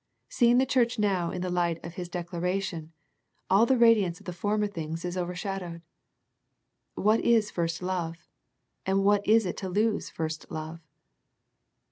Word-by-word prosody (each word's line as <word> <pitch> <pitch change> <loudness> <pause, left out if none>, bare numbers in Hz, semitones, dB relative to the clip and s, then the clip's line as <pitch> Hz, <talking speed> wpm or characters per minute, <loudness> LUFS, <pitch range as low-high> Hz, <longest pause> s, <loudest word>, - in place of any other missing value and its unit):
Seeing 240 0 +4
the 260 - +4
church 245 -2 +1
now 195 -5 +1
in 180 -1 -4
the 180 - -2
light 175 -2 +1
of 170 - -7
His 175 -1 -6
dec 175 -1 -5
laration, 180 -2 -2 0.6
all 205 +5 +5
the 265 - +3
radiance 215 -7 +4
of 200 - -18
the 180 - -5
former 210 +4 0
things 165 -4 -5
is 180 0 -3
over 180 -1 -3
shadowed. 180 -3 -5 1.1
What 215 +2 +3
is 225 -3 +3
first 170 0 -2
love, 175 -3 -2 0.7
and 195 +1 +1
what 205 0 +4
is 220 0 +5
it 180 - -3
to 190 - -4
lose 210 +3 0
first 155 -1 -5
love 155 +1 -6
185 Hz, 165 wpm, -28 LUFS, 170-210 Hz, 1.1 s, all